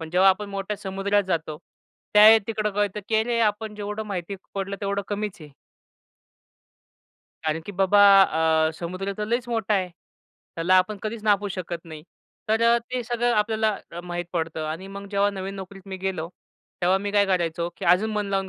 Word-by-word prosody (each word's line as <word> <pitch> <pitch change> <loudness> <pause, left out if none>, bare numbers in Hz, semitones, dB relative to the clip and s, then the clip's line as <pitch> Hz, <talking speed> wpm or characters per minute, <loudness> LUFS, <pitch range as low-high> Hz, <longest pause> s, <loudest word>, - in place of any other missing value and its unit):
पण 160 -1 -7
जेव्हा 185 +2 +5
आपण 200 +2 -3
मोठ्या 200 +1 -4
समुद्रात 195 +1 0
जातो. 160 -5 -3 0.6
त्यावेळी 215 +2 +9
तिकडं 215 -2 -1
कळतं, 205 0 -1
की 220 - -1
"अरे! 235 +1 0
आपण 210 0 0
जेवढं 210 +1 -4
माहिती 195 -1 -4 0.2
पडलं, 195 0 -3
तेवढं 200 0 -1
कमीच 205 -2 -4
आहे." 150 -1 -11 1.9
"कारण 155 +1 0
की 205 - -6
बाबा 195 +2 +3 0.7
अ, - - -2
समुद्र 185 +4 -4
तर 210 - -1
लईच 235 +2 -1
मोठा 225 -2 0
आहे. 185 -2 0
त्याला 175 0 -5
आपण 200 +3 0
कधीच 215 0 -4
नापूू 205 -1 +2
शकत 175 -3 -5
नाही." 155 -2 -10 0.5
तर 220 +1 +2
अ, 235 0 +5
ते 245 +1 -5
सगळं 240 +1 0
आपल्याला 215 0 +1 0.2
अ, 175 - -6
माहीत 175 0 -4
पडतं 160 -2 -2
आणि 165 +5 -5
मग 200 0 -7
जेव्हा 200 0 +2
नवीन 195 0 -5
नोकरीत 195 0 -9
मी 190 -1 -6
गेलो. 165 -4 -2 0.5
तेव्हा 185 +2 +3
मी 205 +1 -3
काय 205 -1 +4
करायचो? 170 -2 0
की - - -6
अजून 180 +6 +3
मन 210 -1 -1
लावून 195 -1 -1
200 Hz, 180 wpm, -24 LUFS, 180-210 Hz, 1.9 s, त्यावेळी